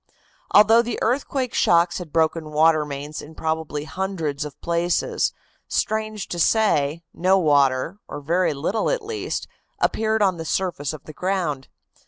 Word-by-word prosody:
Although 220 +3 +6
the 235 -1 -4
earthquake 255 +1 -1
shocks 170 +1 +3
had 175 -4 -8
broken 160 0 +1
water 155 0 +3
mains 145 +1 -6
in 155 +2 -12
probably 160 -2 -2
hundreds 160 -4 -3
of 145 - -9
places, 170 +1 0 0.4
strange 215 -2 -2
to 175 - -4
say, 170 -7 +2
no 185 +2 +3
water, 145 +1 +2
or - - -6
very 170 +2 +1
little 185 +10 -1
at - - -1
least, 430 0 -4 0.3
appeared 220 -1 +1
on 190 -3 +2
the 165 - -5
surface 160 -5 -2
of 155 -3 -9
the 155 - -11
ground. 170 -7 -2
170 Hz, 150 wpm, -23 LUFS, 150-200 Hz, 0.4 s, Although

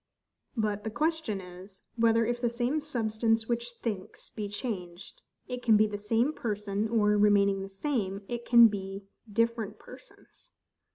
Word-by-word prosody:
But 210 -2 -1
the 220 - -2
question 300 -4 -1
is, 185 +1 -12
Whether 230 -1 +3
if 240 +1 -2
the 240 - +2
same 245 +6 -1
substance 225 -5 0
which 240 0 -2
thinks 205 -5 -4
be 210 -2 -5
changed, 190 -5 -6 0.3
it 250 0 -5
can 225 -3 +5
be 215 - +5
the 210 -1 -4
same 230 +7 +1
person; 210 -4 -2
or, 210 -2 +3
remaining 200 -1 +4
the 195 - -6
same, 200 -3 -2
it 240 -1 -4
can 235 -1 +8
be 195 -1 -5 0.3
different 225 -1 0
persons? 255 - -15
220 Hz, 155 wpm, -29 LUFS, 205-235 Hz, 0.3 s, can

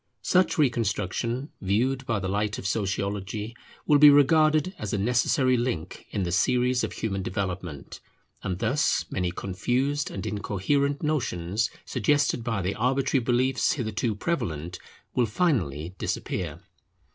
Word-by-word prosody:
Such 185 -1 +3
reconstruction, 120 - 0
viewed 125 +7 0
by 115 -4 +1
the 95 -1 -3
light 105 +2 -1
of - - -7
Sociology, 100 +2 -2 0.3
will 145 -1 +5
be 150 0 +10
regarded 155 +4 +4
as 105 - -4
a - - +1
necessary 125 +4 +2
link 105 -9 -3
in 100 - -2
the 85 - -2
series 125 +8 +2
of - - -3
human 100 -3 -2
development; 90 -5 -4 0.4
and 90 -2 -3
thus 125 - +1
many 90 -1 -1
confused 125 +11 -1
and 95 - -6
incoherent 140 - -1
notions 115 - 0 0.2
suggested 145 -5 +1
by 115 -5 -1
the 95 +2 0
arbitrary 130 +2 +1
beliefs 125 +2 +2
hitherto 110 -4 -2
prevalent 90 - -3 0.3
will 120 -2 +2
finally 95 - 0
disappear. - - -3
115 Hz, 135 wpm, -26 LUFS, 95-135 Hz, 0.4 s, be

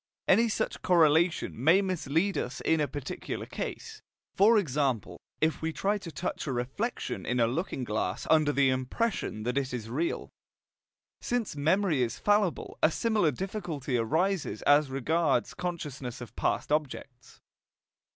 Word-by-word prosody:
Any 230 0 +5
such - - -2
correlation 160 -6 +3
may 165 +6 +6
mislead 185 +1 0
us 125 +2 -3
in 160 -1 +2
a 150 - +1
particular 140 0 -5
case, - - -6 0.3
for 220 +4 +5
example, 140 - -1 0.2
if 160 0 +1
we 160 0 -1
try 205 +5 0
to 180 -4 -8
touch 165 +1 -4
a - - -1
reflection 130 - -3
in 125 0 -1
a 115 - +5
looking 135 +2 -2
glass 105 -5 -2
under 155 -2 +4
the 140 -2 +3
impression 130 - -2
that 125 +4 0
it 130 -2 -3
is 115 -2 -6
"real." 160 +7 -2 0.9
Since 240 -8 -2
memory 160 +1 +2
is 115 -2 -1
fallible, 205 -4 0
a - - +6
similar 210 -1 +1
difficulty 160 - -4
arises 160 - 0
as 145 0 +4
regards 140 0 +1
consciousness 145 -8 -5
of 120 - -10
past - - -1
objects. 130 -4 -3
150 Hz, 145 wpm, -29 LUFS, 130-185 Hz, 0.9 s, may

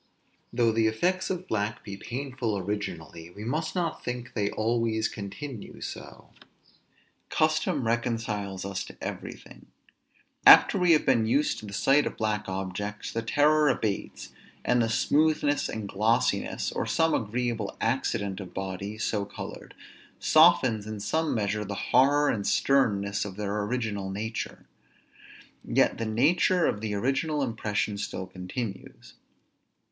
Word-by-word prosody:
Though 120 -1 +2
the 110 0 +2
effects 180 +13 0
of 185 0 -3
black 105 0 -2
be 100 - -7
painful 125 -1 -3
originally, 90 -4 -5
we 100 +4 -10
must 155 +10 -2
not 175 -3 -2
think 125 0 -5
they 100 -2 0
always 110 0 0
continue 105 +4 -7
so. - - -9 1.0
Custom 155 -5 +1
reconciles 115 -5 -2
us 100 0 -3
to - - -12
everything. - - -8 0.8
After 200 - +8
we 180 -2 +5
have 155 - +3
been 115 -5 +3
used 140 +6 +1
to 105 - -9
the 100 - -8
sight 140 +7 +3
of - - -6
black 105 -2 -1
objects, 95 +2 -4
the 115 - -2
terror 150 +5 +3
abates, 110 -6 -2 0.4
and 125 -1 +3
the 115 - +1
smoothness 145 +4 +2
and 110 -2 -4
glossiness, 110 +4 0
or - - -2
some 160 -1 +2
agreeable 115 -1 -2
accident 110 -5 -1
of 95 -3 -9
bodies 95 +3 -4
so 105 -2 0
colored, 100 - -9 0.4
softens 130 -10 +4
in 110 -1 -5
some 160 +9 0
measure 105 -1 -1
the 100 0 -5 0.2
horror 145 +2 +5
and 100 -3 -1
sternness 100 -7 +2
of 100 -2 -6
their 105 0 -2
original 105 -4 -2
nature; 110 +4 -5 1.0
yet - - +2
the 115 - -2
nature 165 +10 +3
of 105 - 0
the 105 -2 -2
original 135 +7 0
impression 105 -3 -2
still 95 - -4
continues. 95 +3 -7
110 Hz, 140 wpm, -27 LUFS, 100-135 Hz, 1.0 s, After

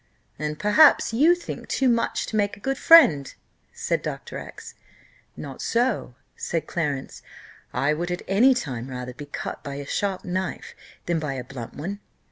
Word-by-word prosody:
"And 150 0 -3
perhaps 225 +4 +5
you 310 +9 +5
think 350 - -8
too 265 - +1
much 235 -1 +1
to - - -5
make 205 -1 0
a - - -15
good 270 +5 -2
friend," 210 - +7 0.4
said - - -2
Dr. - - -5
X. - - -10 0.6
"Not 135 -3 -8
so," 235 - 0 0.2
said 165 -3 -3
Clarence: 145 -6 -3 0.5
"I 145 +2 +1
would 170 +3 -3
at 175 0 -3
any 240 +8 +5
time 130 - -4
rather 125 -1 -6
be 145 +3 -9
cut - - -6
by 140 -2 -6
a 140 0 -6
sharp 195 +4 -2
knife 185 0 -3 0.3
than 170 -1 0
by 150 -3 -3
a 130 -2 -5
blunt 125 -2 -9
one. 190 +8 -5
175 Hz, 170 wpm, -24 LUFS, 140-225 Hz, 0.6 s, friend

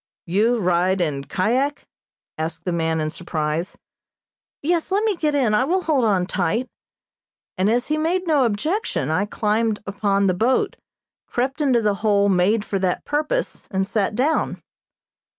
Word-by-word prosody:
"You 215 +7 +2
ride 180 -1 +1
in 145 -5 -1
kyak?" 255 - 0 0.5
asked 160 +1 -4
the 180 - 0
man 165 -1 0
in 155 0 -1
surprise. 160 +1 -3 0.9
"Yes, 335 +2 0
let 400 +3 +1
me 435 -3 +1
get 305 -3 0
in, 250 -7 +2
I 210 - +4
will 365 +7 0
hold 290 -6 +2
on 190 -4 +2
tight," 200 +7 -1 0.9
and, 190 +2 +1
as 240 +3 +1
he 305 +1 -1
made 355 +4 0
no 300 -6 +3
objection, 230 - -1
I 185 +6 +1
climbed 215 +1 0
upon 200 0 0
the 185 - +3
boat, 230 +8 +1 0.5
crept 265 +4 -2
into 255 -5 +3
the 210 -1 +2
hole 200 -2 +3
made 200 +4 +2
for 195 - -2
that 185 -1 -1
purpose 305 +13 -2
and 190 -1 -1
sat 210 0 0
down. 285 +7 0
210 Hz, 160 wpm, -22 LUFS, 185-275 Hz, 0.9 s, I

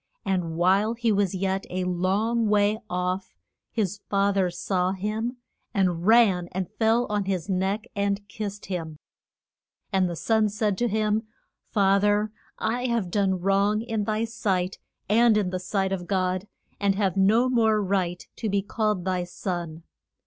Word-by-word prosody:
And 180 -4 -1
while 195 +6 +3
he 235 -1 +1
was 200 -2 +1
yet 190 +1 -1
a 185 0 -2
long 195 +6 +1
way 210 +1 +3
off 180 +1 -2 0.4
his 205 -3 -1
fa 200 0 +2
ther 190 -2 +2
saw 180 +1 -1
him, 215 +6 -3 0.4
and 180 -2 +1
ran 215 -6 +5
and 185 -1 -3
fell 225 +2 +3
on 205 -1 -1
his 185 -3 -2
neck 190 +3 0
and 200 0 -1
kissed 205 -1 -6
him. 165 -5 -5 1.0
And 190 -2 +3
the 170 - -4
son 220 +4 +2
said 210 -1 0
to 240 - +2
him, 215 0 0 0.4
Fa 195 -2 +4
ther 205 +1 +2 0.3
I 245 +3 -1
have 230 -7 -1
done 190 -2 +1
wrong 200 +3 +2
in 225 -3 -2
thy 215 +1 0
sight, 195 -5 -1 0.3
and 225 +1 +5
in 195 -4 0
the 185 - -2
sight 190 +1 -1
of 180 -2 -3
God, 185 0 0 0.3
and 200 -1 +2
have 195 -3 0
no 215 +6 +4
more 225 -4 +3
right 185 -3 -1
to 220 - -2
be 200 0 +1
called 210 -3 -1
thy 185 -1 0
son. 175 -2 -5
200 Hz, 165 wpm, -26 LUFS, 185-215 Hz, 1.0 s, ran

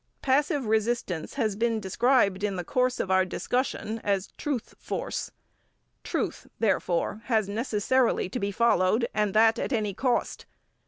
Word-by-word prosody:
Passive 285 0 +2
resistance 220 -6 -1
has 220 -7 0
been 230 +1 0
described 200 -1 +2
in 205 -2 0
the 180 - -3
course 255 +7 0
of 190 - -1
our 190 0 +5
discussion 225 +2 -2
as 195 -1 0
truth 275 -6 -3
force. - - -4 0.7
Truth, - - -3
therefore, 200 -2 0
has 220 -5 +1
necessarily 230 +2 +1
to 250 - -4
be 200 -1 -1
followed, 225 +1 +2
and 210 -2 0
that 225 +1 +5
at - - -2
any 215 -5 0
cost. 245 +3 -1
220 Hz, 145 wpm, -27 LUFS, 200-245 Hz, 0.7 s, our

